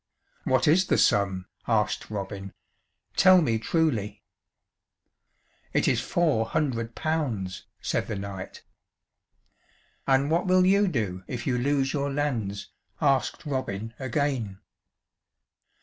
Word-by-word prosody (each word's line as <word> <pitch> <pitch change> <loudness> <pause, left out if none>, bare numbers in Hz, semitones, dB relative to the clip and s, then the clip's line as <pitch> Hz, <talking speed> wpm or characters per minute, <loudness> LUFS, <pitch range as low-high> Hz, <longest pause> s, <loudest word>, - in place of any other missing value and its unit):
"What 130 +2 +2
is 175 +5 +4
the - - +2
sum?" 95 -2 +2 0.2
asked 105 -2 0
Robin. 100 -2 -5 0.6
"Tell 185 -1 +7
me 115 -9 +1
truly." 110 -7 0 1.5
"It - - +2
is - - +2
four 150 -11 +1
hundred 115 -6 -1
pounds," 125 - -2 0.2
said - - -1
the 110 - -3
knight. 100 -1 -7 1.4
"And 135 +2 +3
what 170 +3 +1
will 185 0 +5
you 200 +2 +4
do 100 - -2
if 120 -2 -5
you 130 - +1
lose 135 +2 +1
your 140 -1 -1
lands?" 115 -9 -2 0.3
asked 140 +1 +1
Robin 115 -6 -3
again. 130 -6 -2
130 Hz, 115 wpm, -26 LUFS, 105-150 Hz, 1.5 s, Tell